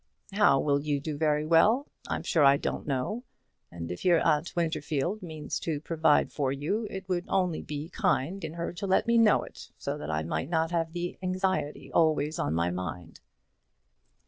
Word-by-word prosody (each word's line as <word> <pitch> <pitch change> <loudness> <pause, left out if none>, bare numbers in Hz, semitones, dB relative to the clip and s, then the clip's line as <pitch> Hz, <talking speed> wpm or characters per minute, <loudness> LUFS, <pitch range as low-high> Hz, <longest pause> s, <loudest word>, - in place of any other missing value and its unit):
"How 200 -9 +5
will 140 -1 +2
you 145 -1 -1
do 150 +1 -4
very 150 0 +1
well? 210 - +4 0.2
I'm - - -3
sure 160 - +2
I 140 0 +7
don't - - -4
know. 150 - -2 0.5
And 85 0 -6
if 90 - -6
your 175 -3 +5
aunt 160 +1 +1
Winterfield 160 +3 -1
means 160 -4 -5
to 155 -3 -2
provide 160 -1 +2
for 140 -3 -1
you, 160 +11 -2
it 190 -1 -7
would 180 -1 -1
only 180 -4 0
be 150 +1 -5
kind 165 +4 0
in 160 -1 -4
her 170 0 -3
to 195 +3 -4
let 190 - +3
me 235 0 +4
know 220 -3 +5
it, - - -11
so - - -4
that 75 - -6
I 80 0 -1
might 85 - -3
not 165 -1 +1
have 165 -1 -1
the 175 0 -4
anxiety 185 -4 -2
always 155 -2 +2
on 75 +2 0
my 85 +1 +1
mind." 90 -2 -6
160 Hz, 190 wpm, -28 LUFS, 140-180 Hz, 0.5 s, I